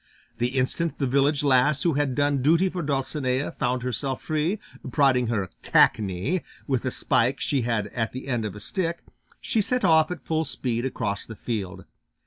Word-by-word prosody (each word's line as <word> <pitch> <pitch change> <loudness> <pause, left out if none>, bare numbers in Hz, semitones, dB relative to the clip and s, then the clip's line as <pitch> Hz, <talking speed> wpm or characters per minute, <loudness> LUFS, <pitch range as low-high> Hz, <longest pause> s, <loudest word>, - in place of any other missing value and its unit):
The 125 +3 -1
instant 155 +6 0
the 140 - 0
village 140 +3 +2
lass 140 +1 +4
who 170 - +2
had 140 -2 0
done 145 -1 +1
duty 165 +7 +4
for 180 -1 -4
Dulcinea 135 -2 -1
found 125 0 -1
herself 125 +2 -2
free, 155 +6 -1 0.3
prodding 130 -5 +3
her 100 -5 -1
"cackney" 105 - +2 0.2
with 130 -4 -1
a - - +1
spike 125 0 +1
she 140 -3 0
had 115 -3 0
at 115 -2 -1
the 130 +2 -7
end 120 -4 -1
of 105 -2 -4
a - - -8
stick, 170 - -3 0.4
she 225 - +1
set 250 +1 +1
off 160 -2 +5
at 180 - -6
full 160 0 0
speed 125 -4 -2
across 100 -6 -3
the 110 - -8
field. 95 -5 -4
135 Hz, 180 wpm, -25 LUFS, 120-155 Hz, 0.4 s, off